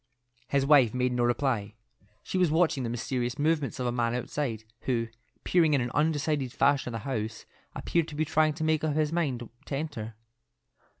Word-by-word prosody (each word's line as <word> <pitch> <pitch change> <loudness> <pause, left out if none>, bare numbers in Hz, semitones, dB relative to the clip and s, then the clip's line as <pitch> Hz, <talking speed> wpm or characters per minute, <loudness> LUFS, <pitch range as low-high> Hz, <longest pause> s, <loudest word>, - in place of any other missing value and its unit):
His 140 0 +1
wife 135 -6 +5
made 125 0 +1
no 120 0 +1
reply. 120 -4 0 0.5
She 185 - -2
was 180 -3 +4
watching 160 -3 +2
the 120 - -2
mysterious 120 +1 -2
movements 150 -2 0
of 125 - -1
a 120 - +1
man 120 -1 0
outside, 125 -2 -3 0.2
who, 115 -3 0 0.3
peering 165 -4 +3
in 135 - +2
an 120 0 -2
undecided 150 -3 +1
fashion 135 -1 +2
at 115 - -3
the 110 - -8
house, 115 -4 -4 0.3
appeared 170 -2 0
to 150 - -8
be 155 +1 0
trying 155 0 +2
to 160 - -5
make 155 -1 +1
up 155 -2 0
his 155 0 +1
mind 135 -9 -1 0.2
to 140 - -2
enter. 135 -7 -5
135 Hz, 190 wpm, -28 LUFS, 120-155 Hz, 0.5 s, wife